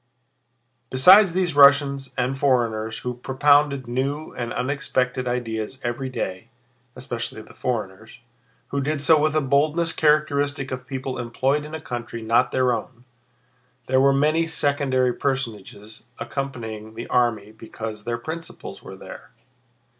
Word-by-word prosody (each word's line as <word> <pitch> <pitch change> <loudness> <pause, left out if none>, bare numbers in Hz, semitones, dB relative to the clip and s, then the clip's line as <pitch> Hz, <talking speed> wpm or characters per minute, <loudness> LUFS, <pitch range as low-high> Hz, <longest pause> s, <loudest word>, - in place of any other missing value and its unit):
Besides 185 +8 +7
these 180 -3 0
Russians 140 -1 +5
and 125 +1 0
foreigners 115 -5 0
who 125 - -1
propounded 140 +1 +2
new 140 +5 -3
and 120 -1 -4
unexpected 125 -1 -1
ideas 120 0 -3
every 120 +2 -3
day—especially 95 -7 -7
the - - -16
foreigners, 110 -3 -4 0.5
who 140 - -1
did 150 +2 -1
so 155 0 +5
with 155 0 +1
a 155 - +3
boldness 150 +5 +1
characteristic 145 -3 +1
of 130 -1 -6
people 130 -1 -4
employed 130 +5 0
in 155 +1 -7
a - - -5
country 120 -4 -6
not 115 +3 +2
their 130 -1 +2
own—there 125 +2 -6
were 140 0 +5
many 155 +4 +2
secondary 140 -5 +1
personages 110 -6 -4
accompanying 115 -4 -5
the 115 - -6
army 110 -4 0
because 110 -1 -8
their 120 +1 -2
principals 160 +7 -8
were - - -10
there. - - -11
130 Hz, 130 wpm, -23 LUFS, 120-140 Hz, 0.5 s, Besides